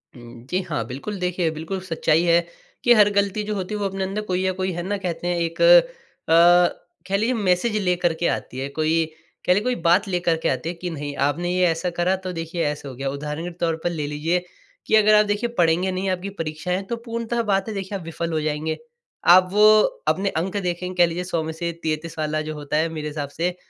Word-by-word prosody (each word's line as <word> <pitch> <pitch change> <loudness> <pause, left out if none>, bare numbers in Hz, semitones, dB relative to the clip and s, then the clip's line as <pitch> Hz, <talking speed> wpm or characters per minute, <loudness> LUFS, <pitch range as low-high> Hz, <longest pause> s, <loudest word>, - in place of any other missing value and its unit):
हुँ। 120 -1 -12
जी 185 +1 0
हाँ, 135 -8 -1
बिल्कुल 140 - -6
देखिए, 180 -2 0
बिल्कुल 160 +5 -5
सच्चाई 165 0 +2
है 170 -1 +5 0.4
कि 240 - +6
हर 210 -3 +6
गलती 200 +1 +1
जो 210 0 -3
होती 190 +1 -4
है - - -3
वो 205 - -1
अपने 195 0 -2
अंदर 195 +3 -2
कोई 180 0 0
या 190 - +2
कोई 185 0 -2
है 175 +1 -4
ना 205 +3 -2
कहते 175 -3 -4
हैं 175 0 0
एक 165 -1 -2
अ, - - +3 0.7
कह 195 +1 +1
लीजिए 225 +5 +1
मैसेज 205 +1 +1
लेकर 180 -2 +1
के 170 +1 -1
आती 130 - -3
है, 135 - -2
कोई 160 +2 +1 0.4
कह 180 - +5
लीजिए 205 +3 +1
कोई 250 +1 0
बात 180 +5 +4
लेकर 175 -3 +1
के - - +2
आती 130 +5 -2
है 175 - -5
कि 180 +1 -5
नहीं 145 -3 -5
आपने 175 +5 -2
ये 180 0 +3
ऐसा 165 +2 -1
करा, 175 +2 0
तो 185 -1 -6
देखिए 165 0 -3
ऐसा 145 -1 -3
हो 130 - -9
गया। 135 +2 -3
उदाहरण 150 +3 -5
के - - -9
तौर 165 -1 +1
पर 175 - +1
ले 160 -4 -3
लीजिए 160 +5 -1 0.4
कि - - +2
अगर 215 0 +6
आप 210 0 +5
देखिए 205 +3 -1
पढ़ेंगे 175 +2 +2
नहीं 185 +1 -2
आपकी 185 +1 -2
परीक्षाएँ 180 +1 -3
तो 235 - -1
पूर्णतः 230 0 -2
बात 195 -2 0
है 220 - -4
देखिए, 195 0 -4
आप 185 - -10
विफल 165 +1 -4
हो 155 - 0
जाएँगे। 155 +1 -2 0.5
आप 185 +1 +7
वो 210 +2 +5 0.4
अपने 195 +1 +1
अंक 185 +4 -2
देखेंगे 180 -1 -3
कह - - +5
लीजिए 175 +2 -3
100 175 -2 -2
में 160 - -4
से 170 +1 -3
33 160 +1 -3
वाला 155 0 -1
जो 155 0 -5
होता 150 0 -3
है, 160 +2 +1
मेरे 155 -2 -5
हिसाब 145 -2 -4
से 175 +5 -2
175 Hz, 240 wpm, -23 LUFS, 160-195 Hz, 0.7 s, आप